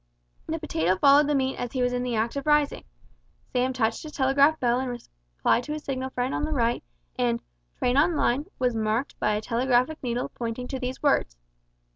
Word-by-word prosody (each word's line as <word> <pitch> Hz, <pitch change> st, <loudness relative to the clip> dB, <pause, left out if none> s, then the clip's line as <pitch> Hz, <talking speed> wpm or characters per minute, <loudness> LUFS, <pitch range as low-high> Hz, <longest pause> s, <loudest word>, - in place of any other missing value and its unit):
The -, -, -2 dB
potato 170 Hz, +4 st, 0 dB
followed 280 Hz, +6 st, +6 dB
the 295 Hz, -, +1 dB
meat 265 Hz, -1 st, 0 dB
as 245 Hz, -, -4 dB
he 255 Hz, -2 st, 0 dB
was 245 Hz, 0 st, +1 dB
in 245 Hz, -, -1 dB
the 245 Hz, -1 st, -2 dB
act 225 Hz, +3 st, -1 dB
of 280 Hz, +1 st, -4 dB
rising. 295 Hz, -1 st, +2 dB, 0.7 s
Sam 255 Hz, +1 st, +1 dB
touched 225 Hz, -3 st, 0 dB
his 305 Hz, -1 st, -9 dB
telegraphic 280 Hz, +4 st, +3 dB
bell 245 Hz, 0 st, +2 dB
in 260 Hz, -1 st, -2 dB
reply -, -, -2 dB
to 295 Hz, +5 st, -5 dB
his 305 Hz, 0 st, -6 dB
signal 260 Hz, -1 st, -3 dB
friend 255 Hz, 0 st, -2 dB
on -, -, -1 dB
the 310 Hz, -, -2 dB
right, 235 Hz, -3 st, 0 dB, 0.4 s
and 120 Hz, -1 st, +1 dB, 0.4 s
"Train 250 Hz, +1 st, +1 dB
on 320 Hz, +4 st, +4 dB
line" 280 Hz, +1 st, +1 dB
was 250 Hz, -1 st, +1 dB
marked 220 Hz, +4 st, -1 dB
by 210 Hz, -, +1 dB
a 210 Hz, -, -2 dB
telegraphic 250 Hz, +5 st, +1 dB
needle 245 Hz, -1 st, -2 dB
pointing 235 Hz, +1 st, -5 dB
to 265 Hz, -, -3 dB
these 255 Hz, +2 st, -5 dB
words. -, -, +2 dB
250 Hz, 205 wpm, -26 LUFS, 235-280 Hz, 0.7 s, followed